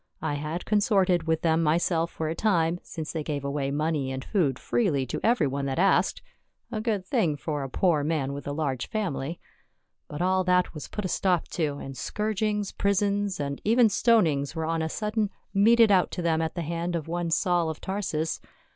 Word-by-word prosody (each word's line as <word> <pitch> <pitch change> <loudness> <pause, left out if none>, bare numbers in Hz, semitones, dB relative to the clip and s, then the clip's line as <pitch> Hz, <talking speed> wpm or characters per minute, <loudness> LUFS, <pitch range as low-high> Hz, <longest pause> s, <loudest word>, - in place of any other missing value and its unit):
I 155 -2 0
had 150 +4 -4
consorted 195 -5 +2
with 160 0 +1
them 165 0 +3
myself 165 +1 +1
for 160 - -4
a 160 - -1
time, 170 -3 +1
since 160 -2 -6
they 160 - -2
gave 145 -2 -3
away 140 -1 -1
money 145 -2 -1
and 130 0 -5
food 155 - +1
freely 155 - 0
to - - -4
everj' 235 -5 +2
one 140 +1 -2
that 135 - -2
asked 195 +3 +2 0.2
— - - -44
a 215 -2 -2
good 215 -5 -1
thing 160 -4 +1
for 150 -1 -3
a 135 - -4
poor 160 0 +2
man 145 -3 -1
with 140 0 -7
a - - -2
large 145 -4 -2
family. 175 - -3 0.7
But 145 - -7
all 185 +1 +2
that 180 0 +2
was 150 - -7
put 210 - -5
a - - +1
stop 180 -1 0
to, 150 -4 -1
and 135 -1 -7
scourgings, 210 - -1
prisons, 200 0 0
and 140 -1 -3
even 230 +1 +5
stonings 175 - +2
were 160 -1 -2
on 165 0 -1
a 160 - -1
sudden 210 +2 -1 0.2
meted 225 +2 +5
out 185 -2 +4
to 180 - -3
them 165 -1 +2
at 160 +1 -2
the 170 - -2
hand 170 +2 -2
of 165 -2 -3
one 170 0 -2
Saul 175 0 +2
of 160 - -5
Tarsus. 180 -5 -2
165 Hz, 205 wpm, -27 LUFS, 150-200 Hz, 0.7 s, even